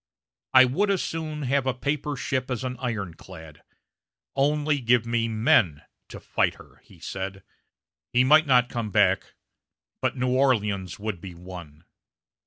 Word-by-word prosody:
"I 130 0 +9
would 185 +12 0
as 195 -3 +1
soon 155 -2 -4
have 135 0 0
a 130 - 0
paper 145 +2 -2
ship 130 0 -2
as 125 -1 -3
an 125 -1 -3
ironclad; 95 - -6 0.7
only 145 +1 +1
give 120 -1 +3
me 115 -1 0
men 110 - +2 0.3
to - - -9
fight - - 0
her!" - - -17
he - - -20
said. 95 0 -6 0.7
He 125 - +4
might 155 +4 +5
not 125 -2 +4
come 115 -3 -4
back; - - +2 0.7
but - - -1
New 125 0 0
Orleans 105 -9 +1
would 105 -4 -5
be 95 -3 -9
won. 85 -3 -11
125 Hz, 150 wpm, -25 LUFS, 95-140 Hz, 0.7 s, I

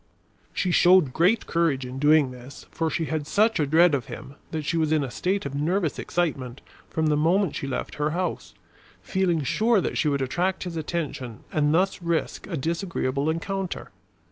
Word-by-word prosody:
She 185 - -1
showed 175 -6 +5
great 185 +7 +3
courage 160 -6 +1
in 125 +1 -6
doing 145 -2 +4
this, 125 +2 -11
for 165 -1 -1
she 160 - -1
had 155 -2 -3
such 220 +3 +2
a 150 - +1
dread 165 +3 +5
of 135 -4 -1
him 135 - -9 0.2
that 155 -2 -4
she 170 - -1
was 160 -2 +1
in 155 -2 +2
a 130 - -5
state 190 +5 -1
of 140 - -4
nervous 160 +3 0
excitement 135 -8 -2 0.3
from 160 - -1
the 150 -1 +3
moment 170 +4 +2
she 140 - -4
left 130 -2 -4
her 150 - +2
house, 180 +3 -3 0.5
feeling 180 -5 0
sure 220 - +2
that - - -2
she 155 - +2
would 140 -2 +1
attract 180 +8 -1
his 175 -2 -6
attention 150 -7 -4
and 150 -1 +2
thus 185 +3 +1
risk 170 -1 -2
a 175 -5 -3
disagreeable 160 -3 -1
encounter. 190 +3 -3
160 Hz, 190 wpm, -25 LUFS, 140-180 Hz, 0.5 s, showed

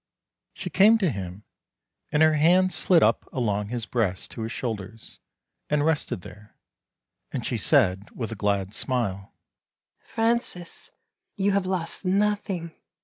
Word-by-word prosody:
She - - -6
came 215 +4 +6
to 190 -8 +1
him, 95 -1 -6 0.7
and 150 +1 +4
her 155 0 +5
hands 180 +5 +4
slid 175 -3 +4
up - - +1
along 105 -5 -1
his 120 0 -4
breast 100 -5 -2
to 115 - -7
his 110 +1 -3
shoulders, 110 -3 -6 0.5
and 150 0 +2
rested 160 - 0
there; 105 0 -13 0.8
and 125 -4 -4
she 120 - -1
said, 100 - +2
with 115 -3 -5
a - - -4
glad 100 -1 -1
smile: 110 -7 -1 0.4
" - - -61 0.2
Francis, 225 -6 -1 0.5
you 200 0 +2
have 195 -1 +1
lost 180 -2 -2
nothing. 195 -3 0
130 Hz, 145 wpm, -25 LUFS, -, 0.8 s, came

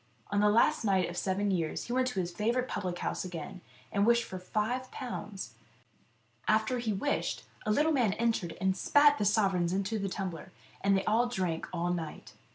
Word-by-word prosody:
On 205 - +2
the 210 0 +5
last 235 +8 +3
night 190 -4 +3
of - - -6
the - - -1
seven 200 +1 0
years 165 -4 -1
he 240 - -4
went 255 0 +2
to 250 -7 -2
his 175 -1 -2
favourite 235 +7 0
public 180 -6 -3
house - - -2
again, 180 0 -7 0.3
and 200 - +2
wished 235 +2 +4
for 185 - -7
five 220 +7 -2
pounds. 205 - -6 0.9
After 220 +3 +2
he 230 -2 -1
wished, 210 +9 -1 0.2
a - - +3
little 300 +8 +3
man 245 -9 +2
entered 225 -7 -1
and 190 0 +1
spat 290 +8 +5
the 205 - +1
sovereigns 190 -4 +2
into 200 +3 -1
the 195 -1 -2
tumbler, 185 -2 -5 0.3
and 200 0 +4
they 195 - -2
all 230 +3 +3
drank 185 -8 -2
all 175 0 -1
night. 165 -3 -6
200 Hz, 195 wpm, -31 LUFS, 185-235 Hz, 0.9 s, the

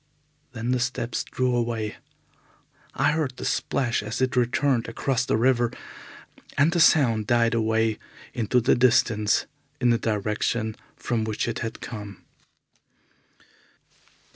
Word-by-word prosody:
Then 115 +1 -3
the 130 - +1
steps 120 -1 -2
drew 125 -1 -1
away. 115 -3 -2 1.0
I - - +2
heard 150 -5 -2
the - - -6
splash 120 -4 0
as 105 +1 -5
it 130 0 0
returned 125 0 +1
across 130 +2 -1
the 135 -4 +1
river, 120 0 +2 0.9
and 145 +4 +4
the 175 - 0
sound 115 -10 +4
died 120 -1 +3
away 110 -1 +1 0.3
into 120 +1 +1
the 120 +2 +3
distance 115 -4 +3 0.3
in 125 -2 +3
the 115 - +2
direction 110 +1 -1 0.2
from 115 -3 -2
which 110 +1 -2
it 120 0 -3
had 115 -1 -5
come. 105 -4 -8
120 Hz, 130 wpm, -25 LUFS, 110-125 Hz, 1.0 s, and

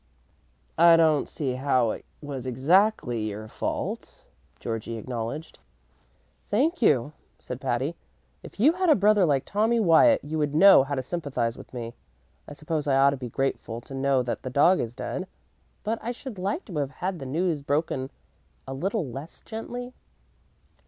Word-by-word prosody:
"I 170 0 +8
don't 155 -3 +3
see 135 -4 -3
how 130 -3 +1
it - - -7 0.2
was 135 -3 -6
exactly 135 - +2
your 105 +1 -7
fault," - - -5 0.3
Georgie 115 0 -4
acknowledged. 120 +6 -5 0.9
"Thank 290 - +1
you," 145 - +3 0.2
said 125 0 -8
Patty. 130 +5 -1 0.5
"If - - -13
you 290 +9 +5
had 365 0 0
a 305 - +7
brother 205 -1 +4
like 140 -3 +1
Tommy 220 +3 +1
Wyatt 220 - +5
you 155 +2 -3
would 150 -1 -1
know 195 -1 +8
how 140 +1 -3
to 130 - -2
sympathize 135 -7 -2
with - - -13
me. 120 -2 -6 0.5
I - - -8
suppose 155 0 -3
I 135 - +3
ought 140 +1 +5
to - - -2
be 125 -2 -6
grateful 120 -2 -2
to 135 - -12
know 135 -1 +1
that 120 - -3
the 130 - -5
dog 150 +8 +4
is 120 0 -3
dead, 185 +7 -4 0.6
but 220 +2 -2
I 235 - -3
should 245 -4 -8
like 200 - -2
to 175 -7 -7
have 140 -2 -1 0.2
had 185 -2 -2
the 135 - -6
news 160 +2 -1
broken 140 -2 -1 0.6
a 135 - -5
little 190 - -2
less 135 +6 -8
gently." 245 +3 -6
145 Hz, 170 wpm, -26 LUFS, 130-195 Hz, 0.9 s, I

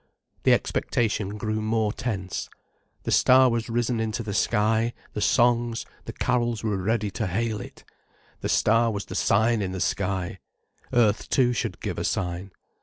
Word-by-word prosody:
The - - +6
expectation 105 -3 0
grew 110 +1 -2
more 110 -1 0
tense. 100 -6 -4 0.5
The - - -2
star 130 0 +6
was 115 0 -2
risen 120 0 0
into 110 +1 -2
the 105 -2 -4
sky, 110 +3 +1 0.2
the 105 - -3
songs, 120 -1 +2 0.2
the - - -6
carols 120 -2 0
were 105 -3 0
ready 105 +2 0
to 110 - -2
hail 105 +3 -1
it. - - -11 0.6
The - - -3
star 115 +2 +3
was 100 -2 -3
the - - -8
sign 110 +2 +2
in 95 -2 -2
the 95 - -4
sky. 95 +1 -1 0.5
Earth 110 -3 +2
too 125 -2 +3
should 115 - -3
give - - -3
a - - -2
sign. 90 +1 -2
110 Hz, 165 wpm, -25 LUFS, 100-120 Hz, 0.6 s, The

